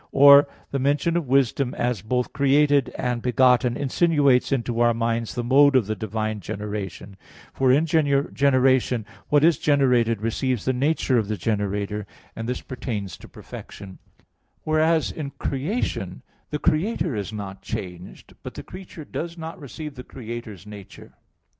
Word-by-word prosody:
Or 140 +1 +8 0.2
the 140 - -1
mention 145 +5 +1
of 170 -5 -1
wisdom 135 0 +1
as 120 -5 -1
both 125 +4 -2
created 140 0 +3
and 125 -2 -2
begotten 125 0 +3
insinuates 145 -2 +2
into 120 -3 -1
our 120 -1 +3
minds 115 0 -1
the 120 - -2
mode 140 +3 +5
of 125 -5 +4
the 110 +2 -2
divine 110 +1 -3
generation; 100 -1 -6 0.4
for 130 -1 +2
in 145 +5 +4
generation 135 -5 +2 0.2
what 145 0 +4
is 165 0 +4
generated 125 -6 +2
receives 120 +1 -1
the 130 - +1
nature 135 -1 +1
of 105 - -2
the 105 0 -2
generator 105 +1 -2 0.3
and 115 +1 -5
this 125 - -3
pertains 110 -6 -5
to - - -13
perfection; 95 -2 -11 0.6
whereas 155 +1 +2
in 150 -3 -5
creation 150 - -3 0.3
the 150 - -2
Creator 165 - 0
is 100 -1 -4
not 100 -2 -7
changed, 90 -1 -7
but - - -9
the - - -7
creature 180 -4 -10
does 170 +3 -5
not 165 +3 -7
receive 150 +1 -8
the 125 -2 -9
Creator's 115 -6 -8
nature. 100 -1 -12
125 Hz, 150 wpm, -24 LUFS, 110-145 Hz, 0.6 s, Or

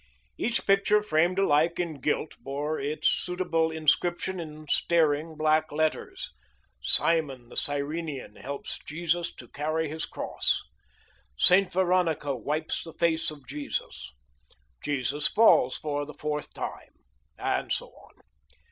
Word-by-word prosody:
Each 235 0 -1
picture 200 +1 +4
framed 175 0 +2
alike 170 -3 +3
in 160 -6 -3
gilt, 150 +2 -1
bore 145 +3 -3
its 145 +3 0
suitable 180 -3 +1
inscription 175 +4 +1
in 155 -2 -8
staring 155 0 +2
black 155 0 +2
letters. 155 +1 -2 0.5
"Simon, 135 - +2
The - - -12
Cyrenean, 145 -3 -2
Helps 140 +1 -5
Jesus 170 +2 -1
to 120 - -11
Carry 155 +3 -2
His 160 +1 -3
Cross." - - -1 0.7
"Saint 185 - +6
Veronica 175 -6 +1
Wipes 150 +6 -2
the 165 - -9
Face 165 -1 +1
of 145 -3 -11
Jesus." 140 - -5 0.7
"Jesus 145 +1 +1
Falls 170 - +5
for 145 -1 -2
the 150 - -10
Fourth 150 -1 -3
Time," - - -6 0.4
and - - -1
so - - -1
on. - - -20
155 Hz, 125 wpm, -28 LUFS, 145-170 Hz, 0.7 s, Saint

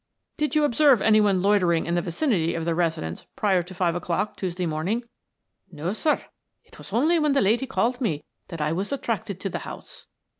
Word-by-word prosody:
"Did 300 -1 -1
you 305 - +4
observe 285 -2 +5
any 215 +1 +4
one 195 -3 +2
loitering 180 -5 +3
in 170 - -2
the 175 - +2
vicinity 170 - 0
of 165 -1 -3
the 170 - +1
residence 160 - -2
prior 195 -4 +2
to 180 +2 -10
five 175 -2 +1
o'clock, 175 +4 -2
Tuesday 180 -1 -3
morning?" 170 +9 -1 0.7
"No, 165 +4 -3
sir. 300 +7 0 0.4
It - - -17
was - - -11
only 315 +8 +3
when 300 -2 +2
the 275 - +3
lady 230 +7 +2
called 245 0 0
to - - -23
me 155 -10 -1 0.2
that 165 -4 -6
I 150 +1 0
was 190 +8 -2
attracted 225 -8 -3
to 195 - -2
the - - -3
house." - - -10
195 Hz, 210 wpm, -25 LUFS, 170-235 Hz, 0.7 s, observe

